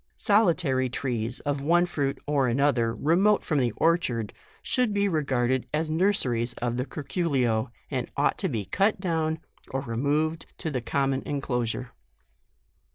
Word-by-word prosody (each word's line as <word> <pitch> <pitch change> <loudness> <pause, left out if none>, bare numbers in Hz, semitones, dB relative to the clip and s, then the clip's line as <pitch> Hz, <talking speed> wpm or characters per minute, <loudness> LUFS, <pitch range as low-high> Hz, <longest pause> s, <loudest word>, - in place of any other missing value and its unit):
Solitary 170 - +2
trees 120 -2 -2
of 145 -1 -2
one 170 +4 +3
fruit 145 -6 -2
or 145 -3 +2
anoth 140 +1 +2
er 115 0 0
remote 190 - +3
from 150 -3 +1
the 125 -2 +2
orchard, 130 - +1 0.3
should 245 -5 +1
be 200 0 +2
re 160 -5 0
garded 130 -1 0
as 155 +1 -1
nurseries 130 - +1
of 120 0 -2
the 125 +2 -2
curculio, 135 -8 0 0.2
and - - -2
ought - - +2
to - - 0
be 105 -3 -2
cut 200 - +1
down 160 -4 0 0.3
or 135 - -2
removed 145 +6 -1
to 160 - -4
the 130 -3 -2
common 135 +2 0
enclosure. 125 -3 -2
140 Hz, 155 wpm, -27 LUFS, 125-165 Hz, 0.3 s, one